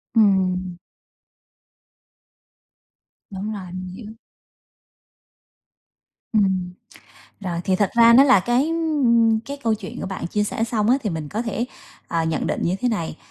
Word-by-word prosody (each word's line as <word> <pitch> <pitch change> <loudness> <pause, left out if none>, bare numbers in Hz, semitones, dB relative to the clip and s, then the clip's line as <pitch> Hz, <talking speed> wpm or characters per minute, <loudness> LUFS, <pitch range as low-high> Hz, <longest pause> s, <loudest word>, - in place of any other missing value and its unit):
Ừm. 185 -4 +2 2.5
Đúng 205 +2 -5
rồi, 190 -4 -8
mình 185 0 -6
hiểu. 210 +4 -9 2.2
Ừm. 190 -4 +1 0.7
Rồi, 175 -3 -3
thì 190 - +1
thật 200 +1 +1
ra 235 0 +7
nó 260 +3 +8
là 265 -7 +6
cái, 240 +8 +1
ưm, 260 -9 +2
cái 275 +6 -8
câu 225 -1 +2
chuyện 210 -3 -7
của - - -3
bạn 190 -2 -5
chia 210 +4 0
sẻ 215 +2 -2
xong 225 -2 0
á 255 - +5
thì 210 - -1
mình 160 -4 -5
có 215 - -2
thể, 230 0 -2 0.4
ờ, 165 -1 -1
nhận 160 -1 -1
định - - -2
như 175 - +1
thế 250 - 0
này, 170 -8 -3
210 Hz, 150 wpm, -22 LUFS, 185-230 Hz, 2.5 s, nó